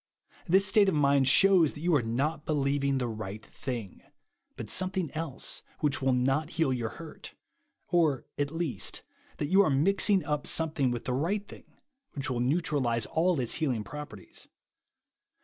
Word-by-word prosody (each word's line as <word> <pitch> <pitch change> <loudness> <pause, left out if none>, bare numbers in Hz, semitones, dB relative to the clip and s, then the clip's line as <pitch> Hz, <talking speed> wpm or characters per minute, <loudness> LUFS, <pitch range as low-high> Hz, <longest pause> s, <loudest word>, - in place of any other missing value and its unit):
This 190 +3 +4
state 200 0 +4
of 180 - -1
mind 140 -2 +3
shews 175 +1 +5
that 145 - -10
you 175 +1 +1
are 145 - +4
not 140 +7 -2
believing 140 -2 0
the 125 -2 -1
right 110 -1 -6
thing; 120 -8 -6 0.5
but - - -7
some 185 0 +1
thing 185 -6 -3
else 155 -4 -4 0.2
which 150 -3 +1
wiU 130 -1 +1
not 135 +5 +1
heal 160 -6 +2
your 120 -3 -2
hurt;. 165 -2 -10 0.5
or, 160 -7 +2
at 145 0 -1
least, 160 - -3 0.3
that 145 - -3
you 195 +2 +6
are 190 - +3
mixing 195 +7 +3
up 150 -1 -2
some 160 -1 +2
thing 140 -4 +1
with 120 -1 -4
the 125 - -1
right 195 +10 -1
thing, - - -13 0.5
wliich 135 -1 -1
will 120 - -1
neutralise 130 -4 0
all 170 -1 +1
its 120 -3 0
healing 130 -9 -1
properties. 125 -4 -9
145 Hz, 170 wpm, -29 LUFS, 130-165 Hz, 0.5 s, you